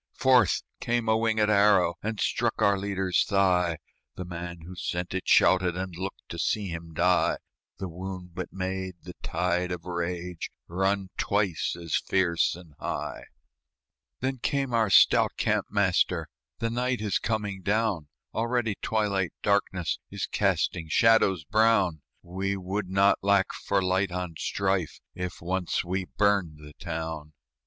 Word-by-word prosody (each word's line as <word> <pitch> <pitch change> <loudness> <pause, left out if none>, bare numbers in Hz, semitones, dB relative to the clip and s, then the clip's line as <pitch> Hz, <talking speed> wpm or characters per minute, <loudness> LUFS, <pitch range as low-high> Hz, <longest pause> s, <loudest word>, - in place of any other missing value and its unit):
Forth 125 -7 +4 0.2
came 120 -1 -1
a - - +4
wingèd 110 -1 +2
arrow, 100 -4 +4
And 110 0 -3
struck - - 0
our 100 0 +4
leader's 95 -2 0
thigh; 90 -4 +2 0.4
The 90 - -5
man 85 -1 -7
who 85 +3 -9
sent 90 +1 -3
it 95 - -3
shouted, 90 -1 +4
And 95 -1 -4
looked 95 +3 -6
to 85 - -6
see 100 +2 0
him 85 -1 -7
die; - - +3 0.4
The 95 - -4
wound 90 0 -7
but 90 0 -5
made 95 -1 -3
the 90 - -9
tide 90 +1 -1
of 90 -1 -5
rage 90 0 -4 0.2
Run 95 +1 0
twice 100 -5 0
as 85 -2 -2
fierce 85 -4 +1
and 85 -3 -14
high. - - -4 1.0
Then 130 0 -1
came 135 0 -1
our 110 -3 +3
stout - - +5
camp - - +1
master, 90 -5 +1 0.3
"The 115 0 -2
night 125 +1 0
is 105 -3 0
coming 105 -4 -2
down; 100 -5 0 0.3
Already 115 -2 0
twilight 100 -5 0
darkness 95 -4 +1
Is - - -3
casting 80 -1 0
shadows 95 -3 +4
brown; 100 -3 +2 0.2
We 95 +3 -2
would 95 +1 -3
not 100 +1 +4
lack 100 -1 +2
for 100 -1 0
light 95 +1 +1
on 90 -1 -3
strife 95 -4 -1
If 90 -2 -6
once 90 0 -1
we 90 +1 -2
burned 100 -7 +2
the 75 0 -13
town." 80 -3 -5
95 Hz, 145 wpm, -27 LUFS, 90-100 Hz, 1.0 s, stout